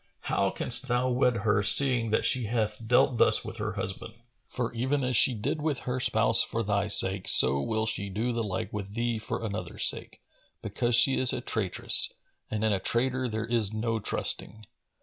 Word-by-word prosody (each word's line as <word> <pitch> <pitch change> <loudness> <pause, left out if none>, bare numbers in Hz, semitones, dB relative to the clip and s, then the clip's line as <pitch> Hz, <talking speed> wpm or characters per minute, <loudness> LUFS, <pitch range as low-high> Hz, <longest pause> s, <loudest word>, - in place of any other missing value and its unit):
How 100 0 -2
canst 125 +6 +1
thou 125 +1 -1
wed 125 -1 0
her, 105 -1 +1
seeing 120 +2 +5
that 110 - -1
she 125 -3 +2
hath 110 0 -4
dealt 120 0 +1
thus - - +3
with - - -8
her - - -5
husband? 105 +3 -7 0.3
For, 120 -2 -5
even 130 +4 -2
as 125 0 -2
she 125 - +4
did 140 +9 -4
with 150 -3 -3
her 125 0 -5
spouse 130 - +3
for 115 - -3
thy 100 -1 -2
sake, 95 -2 +3
so 70 +2 +4
will 110 +8 -3
she 100 -3 -3
do 115 +6 -4
the 115 - -3
like 100 -2 -5
with 100 0 -8
thee 120 -1 -3
for 110 +1 -6
another's 105 0 -5
sake, - - -4 0.4
because 120 0 -1
she 125 +3 +4
is 130 - +6
a - - -3
traitress - - +2 0.4
and 110 0 -4
in 110 -1 0
a 95 - -2
traitor 125 +5 -2
there 110 0 -5
is 115 -3 -2
no 115 +1 -3
trusting. 110 0 -1
115 Hz, 195 wpm, -26 LUFS, 105-125 Hz, 0.4 s, is